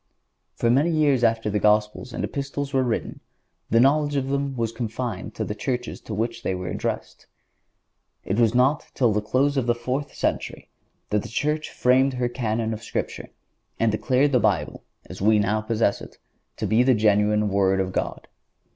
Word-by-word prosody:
For 115 - +1
many 140 +7 +3
years 150 -6 +2
after 115 -1 +2
the 105 - 0
Gospels 105 +4 +1
and - - -4
Epistles 140 0 -4
were 135 - +3
written 120 -3 -2 0.5
the 115 - +4
knowledge 145 +3 +3
of 135 -1 -1
them 140 0 -1
was 115 -1 -1
confined 115 -3 -4
to - - -2
the 105 - -3
churches 125 +2 -4
to 110 - -6
which 115 +2 -2
they 95 - -1
were 90 -1 -5
addressed. - - -4 1.0
It 100 +4 -1
was 115 0 +3
not 130 +4 +2
till 120 -5 +3
the 105 - 0
close 135 +6 +1
of 125 -3 0
the 120 - +3
fourth 130 +4 -3
century - - -3 0.4
that 105 0 +2
the 115 - -9
Church 150 +6 -1
framed 130 +2 +3
her 125 -1 0
Canon 115 -2 -2
of 110 - -6
Scripture 115 - -4 0.5
and 115 -1 +3
declared 130 +6 +2
the 125 - +4
Bible, 85 -10 0 0.2
as - - -10
we 110 +2 +4
now 105 +1 +1
possess 110 -1 0
it, - - -11 0.4
to - - -2
be 110 +2 +3
the 130 0 +4
genuine 105 0 +2
Word 95 -1 +2
of 95 -1 -1
God. - - -3
115 Hz, 185 wpm, -24 LUFS, 105-130 Hz, 1.0 s, the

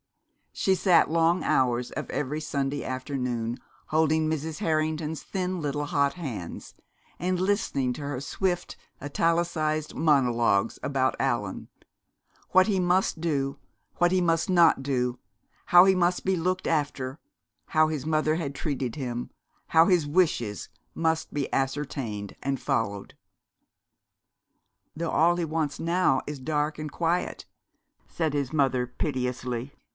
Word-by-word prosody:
She 190 - +2
sat, 180 -5 +4
long 165 +2 +2
hours 125 -1 +1
of 150 - -5
every 150 +2 -2
Sunday 140 -1 -2
afternoon, 125 -3 -3 0.3
holding 160 0 +2
Mrs. 155 0 -3
Harrington's 155 0 -1
thin 185 -2 -3
little 145 0 -2
hot 140 -2 +1
hands, 125 - -6 0.5
and 180 0 0
listening 185 - 0
to 150 - -8
her 140 -2 -3
swift, 175 +5 -2 0.3
italicised 155 0 0
monologues 120 -8 +2
about 135 -2 +1
Allan 120 -8 -2 0.8
what 185 +1 +5
he 200 -3 +1
must 180 -2 +1
do, 140 -4 -1 0.4
what 175 0 +3
he 185 0 +3
must 165 -1 +1
not 170 -6 +5
do, 125 -2 -1 0.5
how 175 +1 +8
he 190 -1 +5
must 180 0 +1
be 190 0 +2
looked 185 +2 -1
after, 145 -4 -1 0.5
how 155 0 +3
his 155 -3 -3
mother 155 0 +1
had 150 -4 -3
treated 135 -6 -3
him, 125 -4 -4 0.4
how 165 0 +5
his 175 -5 +3
wishes 145 - +1 0.3
must 160 -1 -1
be 145 -2 -2
ascertained 135 -7 -2
and 135 -1 -1
followed. 100 -3 -2 1.8
"Though 165 +1 -2
all 170 +2 +4
he 175 - 0
wants 155 -2 -2
now 170 -5 +2
is 150 -1 -5
dark 150 +2 -1
and 155 -1 -5
quiet," 170 +1 -1 0.6
said 160 -3 -2
his 140 -3 -1
mother 135 -5 +2
piteously. 125 -1 -3
150 Hz, 130 wpm, -27 LUFS, 130-165 Hz, 1.8 s, how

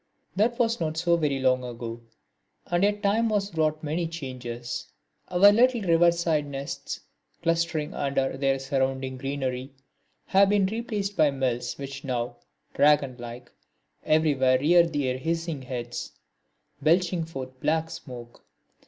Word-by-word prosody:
That 230 +4 +2
was 230 -1 +1
not 160 -1 -2
so 170 +1 +3
very 150 -5 0
long 130 -1 +2
ago, 120 -1 -6 0.6
and 175 +1 0
yet 205 +1 +1
time 220 +3 +2
has 205 -3 -1
wrought 155 -1 0
many 160 +3 -1
changes. 125 -6 -6 0.4
Our 185 +3 +6
little 240 +2 +4
river 170 -1 +5
side 165 -4 0
nests, 140 0 -5 0.4
clustering 165 -2 0
under 135 -1 -1
their 135 0 +1
surrounding 135 -1 -1
greenery, 135 -1 -3 0.5
have 195 +1 +4
been 205 -1 +3
replaced 210 -1 -3
by 155 - +4
mills 130 -3 -2
which 140 0 -7
now, 120 -2 -3 0.4
dragon 145 -3 +3
like, 120 +1 -9 0.5
everywhere 140 -5 +3
rear 170 +4 +5
their 135 -5 -1
hissing 165 -1 -2
heads, 120 -2 -5 0.7
belching 170 +3 +2
forth 130 -5 -8
black 160 +3 0
smoke. 125 -7 -10
150 Hz, 135 wpm, -26 LUFS, 130-170 Hz, 0.7 s, Our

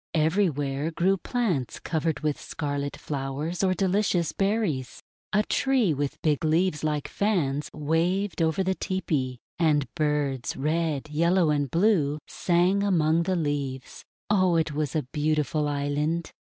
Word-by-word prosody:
Everywhere 155 -4 +1
grew 180 +4 +2
plants 190 - -2
covered 160 -2 -1
with 150 -2 -1
scarlet 145 -2 -3
flowers 145 +5 -3
or 185 -1 +2
delicious 190 -2 +1
berries. 195 - -1 0.3
A 210 0 +3
tree 255 - +2
with 145 0 -3
big 155 -1 +1
leaves 160 0 +1
like 150 -2 -1
fans 155 -9 0
waved 170 +6 0
over 160 +3 +2
the 190 0 +1
tepee, 150 -10 -2 0.2
and 150 -4 +3
birds, 150 -5 -1
red, 155 0 -1
yellow, 170 +1 +3
and 145 -2 0
blue, 165 - +2
sang 180 +3 +2
among 165 -5 +2
the 185 +2 0
leaves. 140 -5 -3 0.2
Oh, 185 -4 +3
it 160 -2 +1
was 150 -2 -2
a 155 - +1
beautiful 150 0 0
island 145 +3 -1
155 Hz, 135 wpm, -26 LUFS, 145-185 Hz, 0.3 s, A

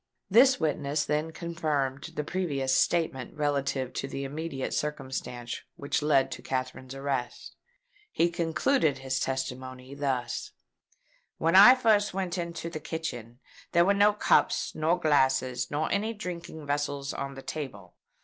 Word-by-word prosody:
This 255 +4 +6
witness 150 -1 0
then 150 +2 -1
confirmed 155 -5 -2
the 150 - -1
previous 145 -6 -1
statement 150 -6 0
relative 140 -3 -1
to 135 - -3
the 135 0 -5
immediate 145 0 -4
circumstances 130 -4 -4
which 140 +2 -1
led 145 -3 +3
to - - -6
Katherine's 130 0 -4
arrest. 135 -3 -4 0.6
He 170 +1 +2
concluded 165 - +1
his 130 0 -2
testimony 130 0 -4
thus: 130 -4 -2 0.8
"When 165 +2 +2
I 210 +7 +10
first 215 -5 +2
went 185 -2 -2
into 170 -1 -4
the 165 -2 -5
kitchen, 125 -7 -6 0.3
there 170 0 +5
were 200 - +4
no 205 +1 +5
cups, 210 - +2
nor 160 +3 +1
glasses, 130 -5 +2
nor 150 +2 -1
any 215 +3 0
drinking 175 -6 -7
vessels 145 -1 -2
on 140 0 -5
the 135 - -9
table. 105 - -6
145 Hz, 140 wpm, -28 LUFS, 130-170 Hz, 0.8 s, I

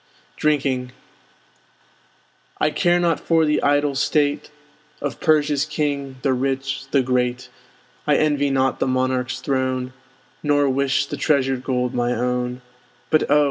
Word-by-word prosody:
DRINKING 135 -4 0 1.7
I 155 - +2
care 175 +2 +2
not 170 -2 +1
for 165 -1 +2
the 150 0 +1
idle 145 0 +2
state 145 +1 0 0.5
Of 145 - -4
Persia's 150 -2 +2
king, 145 -3 -2
the 135 - +2
rich, 135 +1 -2
the 135 -2 +2
great! 125 0 -1 0.6
I 150 - +4
envy 145 -2 +2
not 135 -1 +1
the - - 0
monarch's 130 0 -1
throne, 130 -2 -1 0.5
Nor 145 -1 +2
wish 140 +1 +1
the 145 - -6
treasured 135 -3 +1
gold 125 -2 -1
my 120 0 0
own. 125 +1 -2 0.5
But 155 - +2
oh! 145 +1 +5
135 Hz, 135 wpm, -21 LUFS, 130-145 Hz, 1.7 s, oh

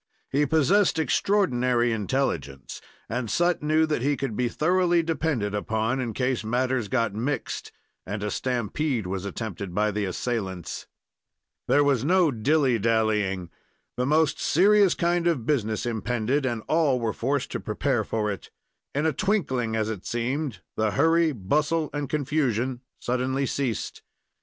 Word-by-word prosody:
He 145 +2 +2
possessed 160 +6 +3
extraordinary 125 -8 +2
intelligence, 100 - -2 0.3
and 120 -1 -3
Sut 175 +6 +1
knew 155 +1 +3
that 150 -5 -1
he 140 +2 +1
could 135 -6 -3
be 125 +1 0
thoroughly 175 +3 +2
depended 150 -10 -1
upon 110 +4 -1
in 120 -3 -2
case 125 -2 0
matters 125 +1 0
got 115 -3 0
mixed, 125 +7 -3 0.3
and 100 0 -5
a 105 - -2
stampede 125 0 -1
was 95 +1 -3
attempted 100 -3 -5
by 105 +1 +2
the 105 0 -1
assailants. 95 -2 -4 0.8
There 145 - +4
was 135 -4 +2
no 175 0 +4
dilly 130 +1 +2
dallying. 105 -5 +1 0.4
The 125 +1 -1
most 155 0 +2
serious 200 +2 +4
kind 175 0 +1
of 145 -10 0
business 110 -6 0
impended, 120 +4 -1
and 115 -3 -3
all 155 -5 +2
were 115 -2 -1
forced 135 +3 -1
to - - -2
prepare - - -1
for 105 -2 -1
it. 100 - -7 0.5
In 145 +2 +1
a 160 - +2
twinkling, 130 - 0
as 110 -1 0
it 105 -4 -5
seemed, 120 - -2
the 110 0 +1
hurry, 165 +1 +4
bustle, 150 - 0
and 145 -2 -3
confusion 130 -4 0 0.2
suddenly 130 +2 -1
ceased. 130 -4 -3
125 Hz, 145 wpm, -26 LUFS, 110-150 Hz, 0.8 s, There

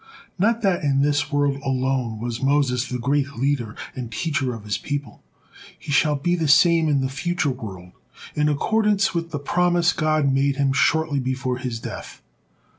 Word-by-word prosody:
But 230 +4 +2
not 190 -3 +2
in 140 -2 +2
this 145 +1 +1
world 145 -1 +1
alone 130 -3 -1
was 120 0 -4
Moses 135 -2 +1
the 125 - -2
great 140 +3 0
leader 125 -4 -1 0.2
and 120 -3 -6
teacher 140 -5 -1
of 115 -3 -7
his 105 0 -2
people, 145 -6 -5 0.6
he 150 - -8
shall 150 +1 +3
be 175 +5 0
the 165 -3 -1
same 160 +2 +5
in 140 -2 +2
the 130 - 0
future 155 +2 -1
world, 95 -8 -8 0.4
in 150 0 +1
accordance 210 +6 +1
with 170 -1 -2
the 150 - -4
promise 175 +3 +2
God 155 -3 +1
made 135 +1 +2
him 135 -1 +1
shortly 155 +1 +2
before 130 -1 -2
his 125 -3 -4
death. - - -8
140 Hz, 175 wpm, -23 LUFS, 130-160 Hz, 0.6 s, same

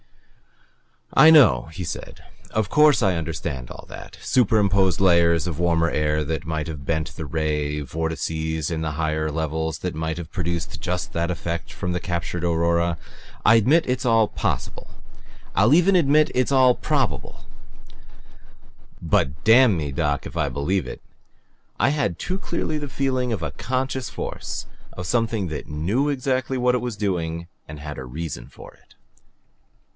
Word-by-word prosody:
"I 150 +4 +8
know," 150 - +6
he 90 - -5
said. 80 - -7 0.3
"Of 110 -2 -1
course 150 -4 +5
I 95 -3 +3
understand 75 -6 -4
all - - -10
that - - -10
superimposed 100 -6 +2
layers 85 -4 +4
of 85 -3 -4
warmer 85 -1 +2
air 75 0 0
that 80 +2 -3
might 80 -1 -2
have 75 -4 -7
bent 80 -1 -2
the 80 - -5
ray; 75 -1 -1
vortices 80 +1 -3
in 80 -1 -2
the 80 -1 -2
higher 80 0 -1
levels 80 0 -2
that 90 - -3
might 80 +1 -3
have 85 -2 -7
produced 85 -3 -3
just 90 +1 -3
that 85 +1 -1
effect 85 -1 -4
of 90 - 0
the 90 - -1
captured 85 -1 -3
aurora. 85 0 +1 0.5
I 115 - +7
admit 140 +10 +4
it's 125 +1 -1
all 115 -2 +4
possible. - - -3 0.6
I'll 105 +7 +4
even 180 +3 +4
admit 150 -1 +4
it's 130 +2 +1
all 130 -2 +5
probable, - - -2 1.6
but 70 +2 0
damn 115 -3 +6
me, 75 -3 -3
Doc, 75 0 -1
if - - -8
I - - 0
BELIEVE 90 +7 -1
it! - - -8 0.8
I 130 - +4
had 140 - 0
too 185 +1 -3
clearly 160 -4 -2
the 145 - -5
feeling 130 -2 -1
of 95 -7 -3
a 80 - -2
CONSCIOUS 130 - -2
force, - - -5 0.3
a 90 - -6
something 110 0 0
that 75 - -6
KNEW 95 - 0
exactly 130 -1 -1
what 125 0 +2
it 125 - +1
was 120 -2 -3
doing 85 -5 -2 0.2
and 75 0 -9
had 75 0 -7
a 65 - -6
REASON 65 -2 -6
for - - -13
it." - - -25
85 Hz, 160 wpm, -23 LUFS, 80-120 Hz, 1.6 s, I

